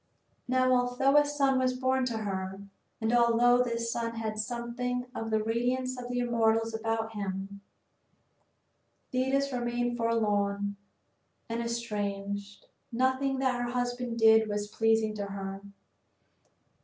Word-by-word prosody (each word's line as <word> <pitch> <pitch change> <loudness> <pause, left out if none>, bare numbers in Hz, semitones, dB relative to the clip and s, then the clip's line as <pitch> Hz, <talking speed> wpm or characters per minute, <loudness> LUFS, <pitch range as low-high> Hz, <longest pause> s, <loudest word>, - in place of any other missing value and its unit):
III - - -43 0.2
Now 255 0 +4
although 250 +3 +2
a 295 - +8
son 275 -2 +2
was 255 0 +1
born 260 0 +1
to 235 -2 -2
her, 190 -2 -3 0.4
and 220 0 0
although 240 +1 +5
this 230 -1 -2
son 230 -1 -2
had 220 -1 -3
something 245 +2 -3
of 225 -3 -4
the 220 -1 +1
radiance 250 +3 0
of 245 -1 -7
the 245 - -2
immortals 225 -2 +2
about 225 0 -2
him, 200 -1 -5 1.5
Thetis 270 +2 +1
remained 240 0 -1
forlorn 205 -3 0 0.7
and 230 +1 -2
estranged. 205 -3 -4 0.3
Nothing 260 +2 +1
that 260 -2 0
her 240 - -2
husband 245 -1 -2
did 220 -1 +6
was 205 0 -2
pleasing 225 0 +2
to 200 -1 -3
her. 195 0 -5
235 Hz, 130 wpm, -29 LUFS, 215-250 Hz, 1.5 s, a